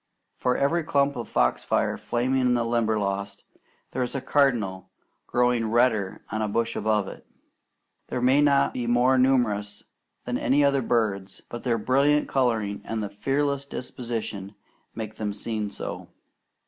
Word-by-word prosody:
For 125 0 0
every 160 +5 +1
clump 140 -3 +1
of 120 - -5
foxfire 60 0 +1
flaming 130 +2 0
in 125 -1 +3
the 120 -1 0
Limberlost, 105 -4 -1 0.5
there 130 - -2
is 125 +2 -2
a - - 0
cardinal 115 -9 +1 0.4
glowing 120 -2 +2
redder 110 -4 +1
on 110 +1 -1
a 110 - 0
bush 115 +2 -1
above 105 -2 +1
it. - - -9 0.8
These 125 - -3
may 130 +3 +5
not 140 -1 +3
be 120 -2 -3
more 125 +2 +4
numerous 105 -6 +1 0.4
than - - -2 0.2
other 140 -1 +3
birds, 105 -5 -1
but 120 - -6
their 120 -3 +1
brilliant 140 +6 +2
colouring 115 -6 0
and 110 -1 -3
the 100 - -4
fearless 140 +6 -1
disposition 115 -6 -5 0.4
make 110 -1 -6
them 105 -2 -3
seem 105 0 -3
so. - - -6
120 Hz, 145 wpm, -26 LUFS, 105-130 Hz, 0.8 s, may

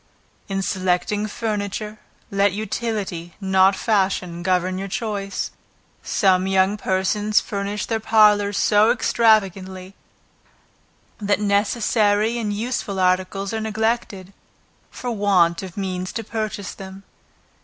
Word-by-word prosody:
In 195 -2 -2
selecting 190 +3 0
furniture, 210 0 -4 0.3
let 200 -1 +2
utility, 205 -5 -4
not 190 0 +3
fashion, 190 -5 0
govern 185 0 0
your 195 - -4
choice; 200 -1 -3 0.5
some 185 -1 +2
young 190 +1 +2
persons 205 +2 +1
furnish 200 0 -3
their 225 -1 -1
parlors 210 -2 +4
so 210 +1 +4
extravagantly, 195 -5 +1 1.3
that 205 -1 +1
necessary 210 +1 +1
and 215 -3 -2
useful 205 -2 -3
articles 185 +2 0
are 220 - -2
neglected, 220 -3 -2 0.6
for 245 - -5
want 190 -6 +2
of 190 -2 -9
means 185 -2 -3
to 225 - -4
purchase 215 -4 -4
them. 190 0 -10
200 Hz, 110 wpm, -22 LUFS, 190-215 Hz, 1.3 s, parlors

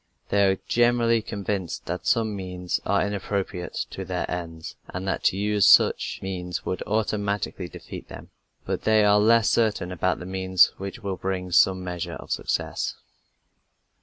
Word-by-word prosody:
They 100 -1 +4
are 95 - +1
generally 120 -1 +3
convinced 100 -4 -4
that 90 +1 -4
some 110 -3 +2
means 90 -2 -3
are 100 +1 +2
inappropriate 100 -3 -3
to 95 - -5
their 90 -1 -2
ends, 80 -2 -6
and 95 +2 -6
that 95 - -1
to 95 - +3
use 105 -1 +3
such - - +5
means 90 -2 -4
would 90 - -3
automatically 100 -3 -1
defeat - - -9
them; - - -11 0.3
but - - -2
they 110 -1 +4
are 105 0 +5
less 115 +1 +4
certain 105 -6 +1
about 90 +1 0
the 90 - -8
means 95 -1 +3
which 100 +5 -7
will 95 -2 -3
bring 95 -1 -3
some 95 +1 +4
measure 90 -1 -4
of - - -10
success. - - -2
95 Hz, 160 wpm, -25 LUFS, 90-105 Hz, 0.3 s, such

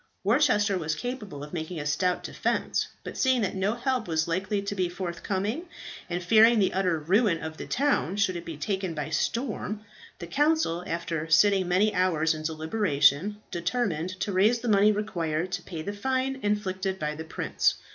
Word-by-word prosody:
Worcester 205 -3 +3
was 155 -2 -1
capable 210 - -5
of 150 - -10
making 165 0 -4
a 145 - -5
stout 180 +5 0
defence, - - -1 0.2
but - - -7
seeing 260 -2 +2
that 195 - -1
no 195 +3 0
help 245 -1 -1
was 160 -1 0
likely 190 +4 -1
to 200 0 -3
be 185 -3 0
forthcoming, 190 - -3 0.4
and 175 0 -2
fearing 225 +5 +6
the 195 -3 +2
utter 185 -3 +1
ruin 185 +4 +2
of 160 0 -6
the - - -7
town 270 - +1
should 200 -3 +1
it 170 - -5
be 165 -3 -7
taken 190 +2 -2
by 150 -2 -4
storm, 220 -3 -2 0.4
the 170 - -7
council, 290 - +1
after 165 -1 -3
sitting 190 +3 +4
many 195 +4 +3
hours 165 -4 +2
in 155 - -6
deliberation, 160 +1 +1
determined 175 -2 -1
to 205 0 -1
raise 205 +6 +4
the 245 - -4
money 210 -1 +5
required 175 -5 -2
to 180 -1 -2
pay 165 -3 -7
the 200 - -4
fine 260 +5 -1
inflicted 195 -2 -1
by 150 -3 -2
the 160 +1 -6
prince. 160 - 0
190 Hz, 180 wpm, -27 LUFS, 165-210 Hz, 0.4 s, fearing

